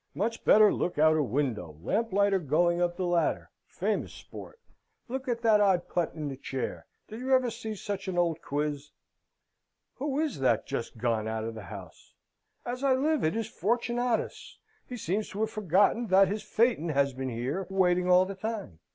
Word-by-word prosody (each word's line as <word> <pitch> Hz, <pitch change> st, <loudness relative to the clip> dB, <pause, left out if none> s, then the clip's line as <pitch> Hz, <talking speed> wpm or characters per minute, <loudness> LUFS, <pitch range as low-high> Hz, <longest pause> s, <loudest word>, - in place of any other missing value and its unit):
"Much 225 Hz, +4 st, -2 dB
better 215 Hz, -1 st, +6 dB
look 175 Hz, -, -2 dB
out 155 Hz, +1 st, +5 dB
a 155 Hz, -, +2 dB
window. 115 Hz, -, -2 dB
Lamplighter 200 Hz, -, +1 dB
going 170 Hz, +3 st, +1 dB
up 175 Hz, 0 st, 0 dB
the 185 Hz, -, -1 dB
ladder 175 Hz, -1 st, 0 dB, 0.2 s
famous -, -, -2 dB
sport. 465 Hz, -, -11 dB, 0.5 s
Look 260 Hz, +2 st, -5 dB
at 235 Hz, -1 st, -2 dB
that 215 Hz, -2 st, +5 dB
old 190 Hz, -3 st, +3 dB
putt 175 Hz, -2 st, -1 dB
in 155 Hz, -2 st, -4 dB
the 135 Hz, -2 st, -5 dB
chair: 135 Hz, -1 st, -5 dB, 0.2 s
did 220 Hz, +1 st, -8 dB
you 260 Hz, +1 st, +3 dB
ever 255 Hz, -2 st, +1 dB
see 220 Hz, -1 st, -6 dB
such 200 Hz, -1 st, -5 dB
an 185 Hz, -2 st, -3 dB
old 165 Hz, -2 st, +1 dB
quiz?" 145 Hz, 0 st, -3 dB, 1.1 s
"Who 280 Hz, +1 st, -2 dB
is 310 Hz, -, -1 dB
that 120 Hz, -4 st, +2 dB
just 115 Hz, -, -5 dB
gone 110 Hz, -2 st, 0 dB
out 110 Hz, 0 st, -2 dB
of 115 Hz, +1 st, -4 dB
the 110 Hz, -3 st, -9 dB
house? 85 Hz, -, -11 dB, 0.5 s
As 250 Hz, +2 st, -4 dB
I 270 Hz, -2 st, +4 dB
live, 300 Hz, +3 st, +1 dB
it's 215 Hz, +8 st, 0 dB
Fortunatus! 240 Hz, +3 st, -1 dB, 0.3 s
He 250 Hz, -, -6 dB
seems 205 Hz, +1 st, -2 dB
to 205 Hz, -, -5 dB
have 220 Hz, 0 st, 0 dB
forgotten 205 Hz, +3 st, +2 dB
that 190 Hz, 0 st, +5 dB
his 210 Hz, +2 st, -2 dB
phaeton 225 Hz, -8 st, +1 dB
has 140 Hz, -2 st, +1 dB
been 130 Hz, +1 st, -4 dB
here, 130 Hz, +11 st, -3 dB
waiting 180 Hz, -1 st, +2 dB
all 180 Hz, +1 st, +6 dB
the 195 Hz, -, -5 dB
time. 200 Hz, -, -5 dB
185 Hz, 185 wpm, -29 LUFS, 150-225 Hz, 1.1 s, better